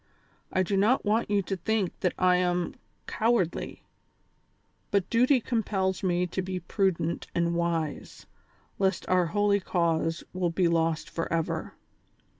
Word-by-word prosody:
I 185 - +2
do 195 +2 -1
not 215 +7 +3
want 215 +2 +1
you 205 -1 +2
to 195 - -3
think 195 +1 -1
that 180 - 0
I 180 0 +4
am 180 -1 0 0.3
cowardly, 220 -7 0 1.1
but 200 -2 +1
duty 250 +3 +4
compels 200 -6 -1
me 180 -2 +1
to 180 +2 -3
be 185 0 -4
prudent 175 -2 -1
and 170 0 +1
wise, 170 -3 -2 0.5
lest 190 -2 0
our 180 -2 +3
holy 205 +2 +2
cause 165 -3 0
will 180 -1 0
be 170 +1 +1
lost 165 -1 +1
forever. 165 -1 -2
185 Hz, 135 wpm, -28 LUFS, 170-200 Hz, 1.1 s, I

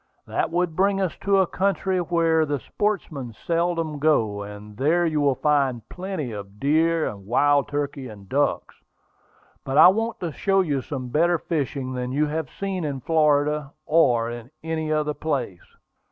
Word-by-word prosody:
That - - -1
would 175 -1 -1
bring 195 +2 +2
us 190 -4 -1
to 200 0 +3
a 190 - +4
country 190 0 0
where 165 -2 +2
the 145 -1 -1
sportsmen 155 - -3
seldom 165 - -1
go; 110 -9 +2
and 105 +1 -9
there 160 +7 +2
you 155 -2 0
will 140 -2 +3
find 135 -6 +1
plenty 180 -8 -4
of 100 -1 -9
deer, 160 -1 +2
wild 135 +8 +2
turkeys, 145 -2 -3
and 100 -2 -12
ducks. 145 +6 -1 0.8
But 135 +1 -2
I 165 - +10
want 225 +4 -1
to 170 -3 -2
show 195 +5 +2
you 145 -7 -1
some 130 -2 -5
better 170 +6 +3
fishing 140 -5 -3
than 125 0 -3
you 145 +3 +2
have 155 -2 -3
seen 195 -3 -4
in 140 -3 -3
Florida, 150 -2 +2
or 120 -8 +3
in 120 0 -8
any 160 -1 -2
other 150 -1 0
place." 135 - -4
150 Hz, 165 wpm, -24 LUFS, 130-170 Hz, 0.8 s, I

